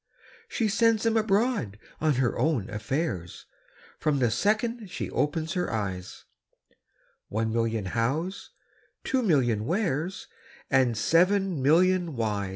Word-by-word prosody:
She 225 - -1
sends 225 +2 +2
'em 225 0 +2
abroad 215 - +1 0.2
on 155 -2 +2
her 125 -1 +1
own 140 -12 0
affairs, 105 - -3 0.5
From 150 -2 +1
the 120 -4 +2
second 215 - 0
she - - -5
opens 160 +3 -1
her 180 -2 -1
eyes 95 -4 -4 1.0
One 110 +1 -2
million 115 -3 0
Hows, 135 - -2 0.5
two 265 -1 0
million 130 - +2
Wheres, 175 - -2 0.4
And 130 -4 +3
seven 185 - +2
million 175 +3 +3
Whys! 105 -4 -1
155 Hz, 120 wpm, -27 LUFS, -, 1.0 s, And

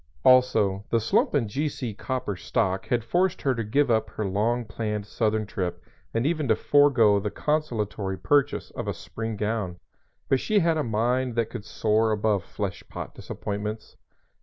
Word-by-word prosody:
Also, 110 -7 +4
the 115 - +3
slump 115 +6 +2
in 125 -6 +2
G.C. 130 -1 -3
Copper 125 -1 -3
stock 95 +2 -1
had 120 0 +1
forced 175 +10 +1
her 135 - +3
to 115 -2 -2
give 130 +5 +2
up 110 -1 +2
her 110 - -4
long 110 +5 0
planned 105 -1 -3
southern 110 0 0
trip 90 -3 -3 0.3
and 115 +2 0
even 155 -2 0
to 110 - +4
forego 120 -6 +4
the 105 +1 -2
consolatory 110 -10 -1
purchase 145 +5 +1
of - - -5
a - - -2
spring 115 -1 -5
gown; 105 -4 -2 0.5
but 135 - +3
she 215 - +1
had 165 -4 +3
a - - +1
mind 120 +2 0
that 115 -1 0
could 115 -4 -6
soar 110 +1 +1
above 105 -3 +1
flesh 100 0 -5
pot - - -7
disappointments. 105 +1 -5
110 Hz, 170 wpm, -26 LUFS, 105-130 Hz, 0.5 s, Also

